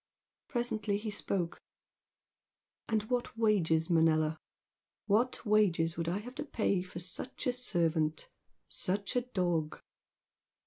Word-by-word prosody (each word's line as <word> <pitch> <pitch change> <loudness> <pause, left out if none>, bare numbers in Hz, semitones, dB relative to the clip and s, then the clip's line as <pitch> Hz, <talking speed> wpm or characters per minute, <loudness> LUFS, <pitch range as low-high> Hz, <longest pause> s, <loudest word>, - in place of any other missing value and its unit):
Presently 220 -5 0
he 215 +1 -4
spoke. 185 -4 -1 1.3
"And 220 -2 +2
what 240 0 -2
wages, 170 -8 +3
Manella? 160 -2 +3 0.7
What 230 +5 +1
wages 185 -6 +3
should 165 -1 -2
I 180 - 0
have 240 +5 -7
to - - -1
pay 215 -9 0
for 185 -1 -9
such 185 +8 -6
a 250 - +2
servant? 165 -10 +1 0.4
such 200 +4 -1
a 245 - +3
dog?" 175 -10 -1
195 Hz, 120 wpm, -32 LUFS, 165-220 Hz, 1.3 s, wages